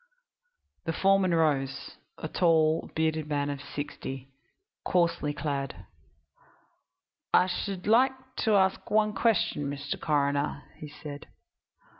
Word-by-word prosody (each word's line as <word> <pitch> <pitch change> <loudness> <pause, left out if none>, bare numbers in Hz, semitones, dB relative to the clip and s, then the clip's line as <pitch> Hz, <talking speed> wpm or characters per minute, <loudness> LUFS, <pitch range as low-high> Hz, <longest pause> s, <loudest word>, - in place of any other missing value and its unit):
The 165 - -1
foreman 195 +1 +3
rose 145 -5 +1 0.3
a - - -5
tall, 160 -2 +2
bearded 160 -1 0
man 145 -1 -1
of 140 -1 -6
sixty, 135 -2 -6 0.5
coarsely 170 -4 +1
clad. 140 -1 -4 1.5
"I 180 - +6
should 185 0 -3
like 250 +5 +5 0.2
to 220 -3 +2
ask 190 -1 +2
one 215 0 +3
question, 195 -9 +1
Mr. 140 0 -4
Coroner," 145 -1 0
he 155 - -8
said. 145 0 -9
155 Hz, 110 wpm, -28 LUFS, 145-185 Hz, 1.5 s, I